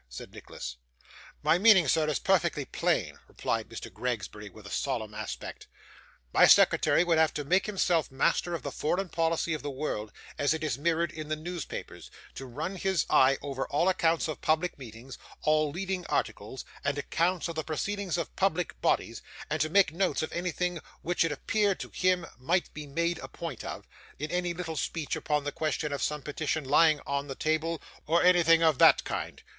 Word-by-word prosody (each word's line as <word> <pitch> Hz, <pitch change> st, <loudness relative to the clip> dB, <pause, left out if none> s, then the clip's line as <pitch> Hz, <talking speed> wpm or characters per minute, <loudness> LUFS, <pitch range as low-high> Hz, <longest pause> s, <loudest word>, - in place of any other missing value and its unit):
said -, -, -9 dB
Nicholas. 60 Hz, -1 st, -8 dB, 0.7 s
'My 170 Hz, -, +4 dB
meaning, 195 Hz, -6 st, +7 dB
sir, 155 Hz, +2 st, +3 dB
is 150 Hz, -, +1 dB
perfectly -, -, +1 dB
plain,' -, -, -1 dB
replied 115 Hz, -1 st, -3 dB
Mr. 115 Hz, -, -8 dB
Gregsbury 105 Hz, -4 st, -4 dB
with 105 Hz, 0 st, -15 dB
a 100 Hz, -, -9 dB
solemn 115 Hz, -6 st, -2 dB
aspect. 105 Hz, -1 st, -6 dB, 0.7 s
'My -, -, +7 dB
secretary -, -, +5 dB
would 170 Hz, -2 st, +2 dB
have 160 Hz, -1 st, +3 dB
to 150 Hz, -, -2 dB
make 185 Hz, +7 st, +2 dB
himself 180 Hz, -6 st, +1 dB
master 170 Hz, +5 st, +1 dB
of 155 Hz, -, -6 dB
the -, -, -4 dB
foreign 180 Hz, +4 st, -1 dB
policy 165 Hz, 0 st, 0 dB
of 155 Hz, -, -3 dB
the 145 Hz, -, -4 dB
world, 130 Hz, -7 st, -4 dB, 0.3 s
as 145 Hz, +2 st, +2 dB
it 160 Hz, -, -5 dB
is 155 Hz, -, 0 dB
mirrored 165 Hz, +2 st, 0 dB
in 155 Hz, -2 st, -7 dB
the 155 Hz, -, -1 dB
newspapers; 170 Hz, +1 st, -7 dB, 0.2 s
to 135 Hz, -, -8 dB
run 160 Hz, +10 st, -4 dB
his 190 Hz, -3 st, +1 dB
eye 130 Hz, +1 st, +5 dB
over 135 Hz, -2 st, -3 dB
all 150 Hz, +5 st, +1 dB
accounts 170 Hz, -3 st, +2 dB
of 155 Hz, -, -5 dB
public 160 Hz, +3 st, +1 dB
meetings, 120 Hz, +1 st, -10 dB, 0.2 s
all 155 Hz, 0 st, +3 dB
leading 185 Hz, +3 st, -3 dB
articles, 110 Hz, +6 st, -3 dB, 0.2 s
and 140 Hz, 0 st, 0 dB
accounts 170 Hz, +5 st, 0 dB
of 170 Hz, -, -4 dB
the 160 Hz, -1 st, -3 dB
proceedings 185 Hz, +3 st, -2 dB
of 170 Hz, -, -4 dB
public 180 Hz, -2 st, 0 dB
bodies; -, -, 0 dB, 0.3 s
and -, -, 0 dB
to 155 Hz, -, +1 dB
make 180 Hz, -2 st, +4 dB
notes 185 Hz, -1 st, 0 dB
of -, -, -5 dB
anything 180 Hz, 0 st, -2 dB, 0.2 s
which 175 Hz, 0 st, +1 dB
it 165 Hz, -, 0 dB
appeared 205 Hz, +6 st, 0 dB
to -, -, -6 dB
him 180 Hz, -2 st, +1 dB
might 170 Hz, +8 st, 0 dB
be 150 Hz, -1 st, -7 dB
made 170 Hz, +4 st, -1 dB
a -, -, -7 dB
point 165 Hz, -8 st, -7 dB
of, -, -, -7 dB, 0.3 s
in 150 Hz, +2 st, -4 dB
any 180 Hz, 0 st, 0 dB
little 170 Hz, -2 st, -5 dB
speech 155 Hz, 0 st, -2 dB
upon 150 Hz, -1 st, -1 dB
the 145 Hz, -, -2 dB
question 155 Hz, -1 st, -2 dB
of 140 Hz, -, -3 dB
some 150 Hz, -2 st, -1 dB
petition 155 Hz, +1 st, -2 dB
lying 150 Hz, +3 st, +4 dB
on 140 Hz, 0 st, -2 dB
the 135 Hz, -, -5 dB
table, 160 Hz, +2 st, 0 dB, 0.3 s
or 170 Hz, +3 st, +3 dB
anything 170 Hz, -2 st, +5 dB
of 160 Hz, -5 st, +3 dB
that -, -, +7 dB
kind. -, -, -5 dB
160 Hz, 190 wpm, -29 LUFS, 140-175 Hz, 0.7 s, meaning